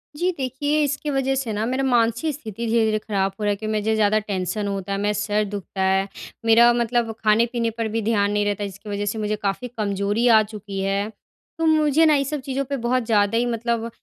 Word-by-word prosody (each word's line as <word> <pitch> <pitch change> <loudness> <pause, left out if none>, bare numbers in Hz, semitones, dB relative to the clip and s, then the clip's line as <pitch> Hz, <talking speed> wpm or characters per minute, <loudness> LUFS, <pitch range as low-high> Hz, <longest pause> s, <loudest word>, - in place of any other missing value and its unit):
जी 355 +4 +1
देखिए, 275 +3 -1
इसकी 290 +1 -2
वज़ह 270 -1 0
से 255 -5 -2
ना 210 +1 -1
मेरा 260 +3 -1
मानसिक 240 +3 +1
स्थिति 230 -4 -6
धीरे-धीरे 220 -1 +2
ख़राब 195 -3 -1
हो 210 - -4
रहा 205 - +1
है 205 - 0
क्योंकि 215 +1 -3
मुझे 220 +1 0
ज़्यादा 215 0 +3
टेंशन 205 0 -3
होता 195 -1 -4
है 195 - 0
मैं 205 +1 +1
सर 210 +1 0
दुखता 200 -1 -6
है। 190 +1 +2 0.4
मेरा 235 +1 +6
मतलब 235 -1 0
खाने-पीने 230 +2 +2
पर 230 -1 -1
भी 225 +1 -2
ध्यान 205 -2 +1
नहीं 205 0 +1
रहता 205 0 -1
जिसकी 200 +2 -9
वज़ह 205 0 -2
से 220 - -2
मुझे 215 0 -1
काफ़ी 205 +4 -3
कमज़ोरी 205 +2 0
आ 220 -2 +7
चुकी 205 -2 -7
है। 195 +2 -1 0.5
तो 330 - 0
मुझे 310 0 +4
ना 305 - +5
ये 275 - +2
सब 290 +1 -4
चीज़ों 270 +1 -2
पे 280 +1 -3
बहुत 250 +1 0
ज़्यादा 210 -1 +2
ही 240 - +2
मतलब 235 -1 -1
220 Hz, 220 wpm, -22 LUFS, 205-250 Hz, 0.5 s, आ